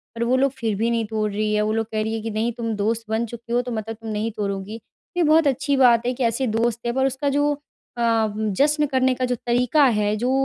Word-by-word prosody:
पर 230 - -1
वो 245 +2 +2
लोग 270 +1 +2
फ़िर 225 -5 -2
भी 225 +4 0
नहीं 230 -1 0
तोड़ 215 -1 -1
रही 210 +1 -1
हैं 210 - +2
वो 215 +1 0
लोग 225 0 0
कह 215 -1 -1
रही 220 +1 -2
हैं 225 - -3
कि 225 - -3
नहीं 220 +3 -1
तुम 230 -1 -3
दोस्त 220 +3 -1
बन 220 +2 0
चुकी 235 +1 -8
हो 245 - +3
तो 245 0 -6
मतलब 225 0 -4
तुम 225 0 -9
नहीं 215 +2 -2
तोड़ोगी। 205 +1 -4 0.4
ये 350 - +3
बहुत 315 0 +4
अच्छी 280 +1 +1
बात 240 -3 +5
है 250 - 0
कि 255 - -3
ऐसे 235 +3 0
दोस्त 225 +1 0
है 235 - +1
पर 265 +1 +1
उसका 270 +2 -1
जो 290 +1 +2 0.4
अ, 230 -2 +2
जश्न 280 +9 +1
करने 260 -1 +2
का 255 - -1
जो 250 0 -1
तरीका 245 +5 +2
है 210 -4 +2
जो 245 +4 0
230 Hz, 265 wpm, -22 LUFS, 220-255 Hz, 0.4 s, बात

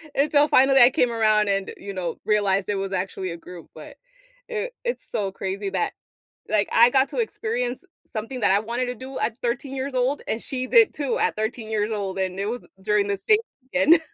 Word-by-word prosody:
Until 290 +1 +4
finally, 270 -1 +5
I 240 - +9
came 250 -2 +1
around 215 -2 +3
and, 195 -1 -1
you 200 0 -7
know, 175 -3 -4
realized 200 -2 +1
it 205 - +1
was 195 0 -3
actually 185 0 -3
a 170 - -6
group, 175 0 -11
but - - -12 0.5
it 475 +2 -3
it's 485 0 -3
so 205 -4 -1
crazy 195 +1 -4
that, 185 -2 -1 0.6
like, 210 -1 +1
I 235 +2 +6
got 265 +1 +3
to - - -5
experience 470 +2 -2 0.3
something 235 +3 -5
that 205 - +3
I 200 - +4
wanted 235 +3 -2
to 250 - -3
do 260 +2 -8
at 225 - -1
13 245 +3 -2
years 265 0 -4
old, 255 +3 0
and 225 - -2
she 255 -1 -3
did 455 - +5
too 285 -4 -1
at - - +1
13 220 +1 -3
years 215 0 0
old, 195 -3 -3
and 185 0 -2
it 200 - -1
was 240 +3 -3 0.2
during 210 0 +2
the 200 - 0
same 425 - +3 0.2
weekend. 285 +5 +4
225 Hz, 210 wpm, -24 LUFS, 200-270 Hz, 0.6 s, I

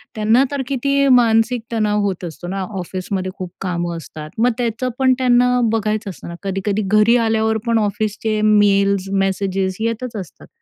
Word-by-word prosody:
त्यांना 220 +4 +3
तर 285 -1 -2
किती 275 +1 +1
मानसिक 230 +1 +2
तणाव 210 -2 +1
होत 190 -3 -2
असतो 170 +1 -8
ना? 195 +2 -3 0.2
ऑफिसमध्ये 185 +1 -4
खूप 180 -2 -6
कामं 175 -2 -2
असतात, 155 -1 -9
मग 245 +2 +4
त्याचं 240 +1 -1
पण 260 -1 +4
त्यांना 250 0 +3
बघायचं 215 -1 -1
असतं 180 - -11
ना. 170 - -7
कधी-कधी 195 +2 -1
घरी 215 +3 +4
आल्यावर 220 0 +1
पण 230 -1 +3
ऑफिसचे 215 +1 -1
मेल्स, 200 -2 +3 0.2
मेसेजेस 190 -1 -1
येतच 230 +2 -3
असतात. 190 -7 -8
215 Hz, 160 wpm, -19 LUFS, 195-230 Hz, 0.2 s, मग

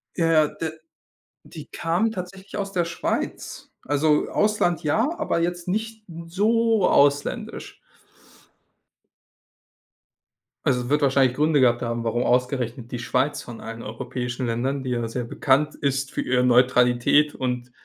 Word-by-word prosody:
Ja, 165 - +1
ja, 155 -2 +5
d 160 +1 -5 0.8
die - - -10
kamen 175 +7 0
tatsächlich 190 +1 -8
aus 195 -1 -3
der 175 -3 +1
Schweiz. 170 - -4
Also, 150 +2 +1
Ausland 210 -5 +1
ja, 220 - +1
aber 170 - 0
jetzt 175 +1 -2
nicht 220 +2 -3 0.2
so 220 +3 +2
ausländisch. 145 0 +1 2.9
Also, 125 0 0
wird 150 +1 +2
wahrscheinlich 135 -2 +3
Gründe 150 -1 +2
gehabt 120 -2 +3
haben, 115 -1 -2
warum 120 +2 0
ausgerechnet 125 -1 -1
die 120 - -4
Schweiz 140 +4 0
von 120 -2 -10
allen 115 +1 -7
europäischen 125 +3 -5
Ländern, 130 +4 -2
die 130 - -3
ja 120 -1 -1
sehr 120 +2 -4
bekannt 140 +5 +1
ist 135 -1 -2
für - - -2
ihre 125 0 +1
Neutralität 125 +3 +4
und 125 -1 -3
140 Hz, 135 wpm, -24 LUFS, 125-170 Hz, 2.9 s, ja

